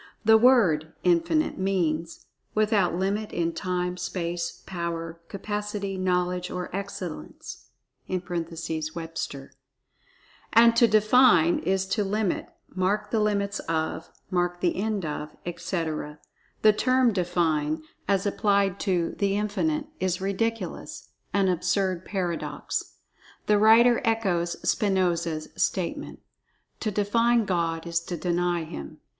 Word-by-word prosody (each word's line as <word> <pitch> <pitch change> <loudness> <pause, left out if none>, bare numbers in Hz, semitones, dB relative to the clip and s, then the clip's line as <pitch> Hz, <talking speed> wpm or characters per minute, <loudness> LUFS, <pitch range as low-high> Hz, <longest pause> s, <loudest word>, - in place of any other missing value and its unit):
The 220 +1 +7
word 215 -11 +4
"Infinite" 185 - +2
means 170 -4 -1 0.3
"without 210 -5 +2
limit 200 +4 -1
in 170 -1 -1
time, 180 0 -2
space, 170 -2 -4
power, 170 -2 -4
capacity, 205 0 -4
knowledge 180 -1 0
or 180 0 -5
excellence" 190 - -7 0.4
(Webster). 165 -4 -4 1.0
And 230 +1 +7
to 235 0 +6
"define" 215 -5 +5
is 190 0 0
to[Pg 190 - -1
15] 200 -2 0
"limit"; 210 -4 0 0.3
"mark 190 +3 0
the 225 - +2
limits 205 -1 0
of"; 160 0 -2 0.2
"mark 175 -1 0
the 175 - +1
end 205 -2 -1
of," 150 0 -5
etc. 160 -3 -3 0.5
The 215 -1 +7
term 255 +1 +3
"define," 160 -4 0 0.2
as 195 0 +1
applied 200 -1 +1
to 180 -4 0
"The 200 -1 +1
Infinite," 290 +9 -1
is 185 -1 0
ridiculous—an 200 -1 -3
absurd 185 0 0
paradox. 180 -4 -3 0.5
The 210 -1 +3
writer 230 +3 +6
echoes 190 -7 0
Spinoza's 175 -5 +1
statement: - - -2 0.6
"To 220 - -1
define 230 +3 +2
God 165 -3 -1
is 170 0 0
to 175 - -4
deny 175 0 0
Him." 70 - -8
185 Hz, 115 wpm, -26 LUFS, 170-210 Hz, 1.0 s, The